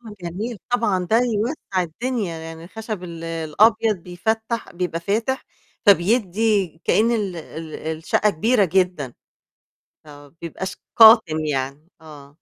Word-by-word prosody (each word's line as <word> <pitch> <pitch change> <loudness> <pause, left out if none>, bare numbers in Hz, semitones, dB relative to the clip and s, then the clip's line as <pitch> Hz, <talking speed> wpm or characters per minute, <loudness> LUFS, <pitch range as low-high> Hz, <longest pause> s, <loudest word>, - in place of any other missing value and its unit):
آه 220 -3 -11
جميل 205 +7 -5
طبعًا، 205 -7 +1
ده 220 - +5
يوسّع 225 - -1
الدنيا، 195 0 -3
يعني 160 0 -9
الخشب 215 +1 -6
ال 165 -1 -8
الأبيض 210 +8 +2
بيفتّح، 220 +6 -3
بيبقى 175 -1 -3
فاتح، 225 +9 -1 0.4
فبيدي 205 0 +3 0.2
كأن 225 +2 +3
ال 205 -6 -1
ال 160 -1 -8 0.2
الشقة 210 +6 +1
كبيرة 215 +5 +2
جدًا. 180 -7 0 0.9
آه، 145 -1 -13
ما - - -33
بيبقاش 185 +3 -5 0.2
قاتم 220 -8 +7
يعني، 140 +2 -3
آه. 145 -3 -13
185 Hz, 125 wpm, -22 LUFS, 165-220 Hz, 0.9 s, قاتم